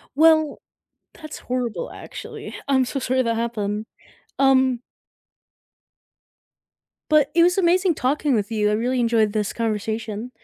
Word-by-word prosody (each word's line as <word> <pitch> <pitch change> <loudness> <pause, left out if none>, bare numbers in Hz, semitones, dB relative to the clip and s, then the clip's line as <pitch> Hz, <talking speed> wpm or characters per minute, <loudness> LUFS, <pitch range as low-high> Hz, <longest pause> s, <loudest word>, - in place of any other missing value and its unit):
Well, 315 -1 +4 0.5
that's 310 -2 -10
horrible, 250 - -3
actually. - - -9
I'm 265 -2 +3
so 275 - -3
sorry 260 0 0
that 230 -2 0
happened. 215 -2 -2 0.5
Um 260 -2 +3 2.3
But 300 -2 +4
it 340 - +5
was 355 +2 +4
amazing 365 -1 +3
talking 285 +1 0
with 215 +1 -1
you. 210 -1 +1
I - - +1
really 250 +3 0
enjoyed 230 -3 +2
this 210 -2 -1
conversation. 220 +1 -3
250 Hz, 125 wpm, -22 LUFS, 220-290 Hz, 2.3 s, it